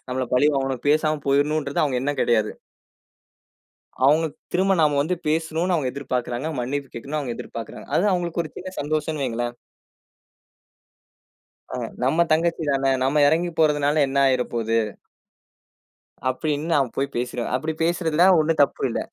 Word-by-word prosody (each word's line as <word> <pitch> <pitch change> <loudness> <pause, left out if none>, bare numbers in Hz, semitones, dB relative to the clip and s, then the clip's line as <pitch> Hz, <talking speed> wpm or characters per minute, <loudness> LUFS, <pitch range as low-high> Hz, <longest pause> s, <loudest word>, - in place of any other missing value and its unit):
நம்மள 130 0 -2
பழி 145 +4 +4
வாங்கணும் 135 -2 -1
பேசாம 155 0 +2
போயிரணும்ன்றது 145 +1 +1
அவுங்க 130 -4 0
எண்ணம் 145 +1 -2
கெடையாது. 110 -3 +2 1.6
அவுங்க 155 +4 +4 0.3
திரும்ப 190 +2 +3
நாம 150 -2 +3
வந்து 170 +5 0
பேசணும்னு 160 +3 0
அவுங்க 135 -6 0
எதிர்பார்க்கிறாங்க. 130 -1 -3
மன்னிப்பு 135 +2 -3
கேட்கணும்னு 140 +6 -4
அவுங்க 120 -4 -4
எதிர்பார்க்கிறாங்க. 115 -2 -8
அது 190 - +2
அவுங்களுக்கு 175 -1 -1
ஒரு 155 - -9
சின்ன 185 +1 -7
சந்தோஷம்னு 155 0 -2
வைங்களேன். 120 0 -2 2.2
ஆ, - - -3 0.3
நம்ம 155 +7 +3
தங்கச்சி 165 +1 +1
தான 135 -1 +2
நம்ம 145 +3 +2
எறங்கி 170 +3 +2
போறதுனால 150 -1 +3
என்ன 135 +1 -2
ஆயிரப்போது 120 -3 0 1.5
அப்டின்னு 150 +3 -2
நான் 135 -4 +1
போய் 140 +1 -2
பேசிறேன். 120 -1 -3
அப்டி 155 +5 -2
பேசுறதுல 165 -1 +2 0.2
ஒண்ணும் 155 0 +1
தப்பு 140 - +1
இல்ல. - - -2
145 Hz, 135 wpm, -23 LUFS, 130-160 Hz, 2.2 s, பழி